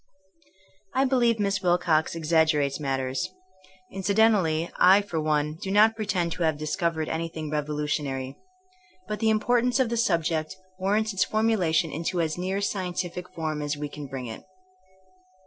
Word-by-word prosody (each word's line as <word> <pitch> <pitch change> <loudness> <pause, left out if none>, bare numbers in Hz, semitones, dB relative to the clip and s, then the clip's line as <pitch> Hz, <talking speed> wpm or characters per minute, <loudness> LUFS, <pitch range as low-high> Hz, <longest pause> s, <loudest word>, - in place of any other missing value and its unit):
I 265 +1 +3
believe 240 -4 +2
Miss 195 -2 0
Wilcox 175 -3 +2
exaggerates 155 -3 +2
matters. 135 -2 -2 0.6
Incidentally 195 -4 +2
I 190 +3 +6
for 170 -6 -3
one 150 0 0
do 190 - -4
not 215 +3 +5
pretend 190 -6 -1
to 170 +2 -5
have 160 -2 +2
discovered 160 +1 -1
anything 160 -2 -4
revolutionary. 150 -3 -2 0.7
But 210 0 -4
the 225 - +2
im 215 0 +3
portance 245 +2 +2
of 255 -3 +2
the 235 - -1
subject 165 -7 0 0.2
warrants 210 +3 +1
its 190 - +2
formula 215 -6 +1
tion 165 0 +2
into 170 +3 -2
as 160 -2 0
near 190 +3 -2
scientific 180 -2 -3
form 155 -2 -3
as 145 0 -2
we 150 0 -4
can 145 -1 -8
bring 130 -1 -6
it. 110 -2 -8
170 Hz, 150 wpm, -26 LUFS, 155-200 Hz, 0.7 s, I